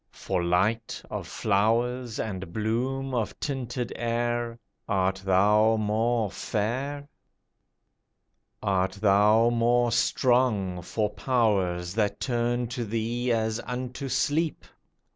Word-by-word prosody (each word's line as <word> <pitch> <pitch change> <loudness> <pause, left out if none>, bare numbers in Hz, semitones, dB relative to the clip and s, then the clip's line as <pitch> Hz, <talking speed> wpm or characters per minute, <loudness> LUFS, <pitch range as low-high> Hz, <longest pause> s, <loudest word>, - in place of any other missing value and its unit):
For 90 -2 -3
light 105 +7 0
of - - -4
flowers, 115 +4 0
and 95 -5 -4
bloom 125 +6 -2
of 115 -4 -2
tinted 125 -3 -3
air, 120 0 -1 0.3
Art 95 -1 +1
thou 105 +4 +4
more 110 0 0
fair? 135 +7 -3 1.6
Art 95 -1 +1
thou 105 +3 +4
more 120 +1 +2
strong 115 -6 +2
For 105 +4 -2
powers 100 -6 0
that 105 -1 0
turn 120 -1 0
to 120 0 -3
thee 115 +3 -1
as 110 0 0
unto 125 +2 -5
sleep? 155 +5 0
115 Hz, 105 wpm, -27 LUFS, 105-120 Hz, 1.6 s, thou